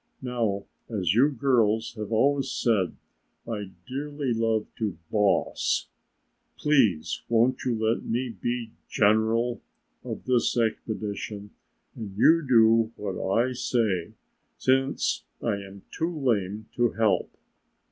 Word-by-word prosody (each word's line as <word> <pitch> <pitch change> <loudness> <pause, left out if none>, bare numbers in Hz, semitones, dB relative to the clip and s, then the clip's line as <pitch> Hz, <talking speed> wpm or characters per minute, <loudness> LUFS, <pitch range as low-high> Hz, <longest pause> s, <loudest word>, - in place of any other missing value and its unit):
Now 115 -6 -1 0.2
as 95 -6 0
you 130 +7 +5
girls 115 -5 +1
have 110 -2 -6
always 135 +4 +2
said 105 -9 +1 0.5
I 105 -4 -4 0.2
dearly 140 0 -3
loved 115 -1 -1
to 105 -7 -2
boss, 105 -2 +1 0.7
please, 120 - +2
won't 120 +2 +2
you 125 -2 +1
let 110 +1 0
me 125 +2 -1
be 115 +2 -3 0.2
general 110 +3 +2 0.4
of - - -6
this 125 -1 +2
expedition 105 -2 -3 0.4
and 100 -3 -7
you 165 +9 +6
do 115 -2 +5
what 95 -2 -3
I 130 - -3
say 110 -8 0 0.4
since 135 +1 +1 0.2
I 110 -4 -1
am 100 0 -10
too 165 +1 -1
lame 110 -6 -1
to 120 -1 +2
help?" 110 -3 +1
115 Hz, 115 wpm, -26 LUFS, 105-125 Hz, 0.7 s, you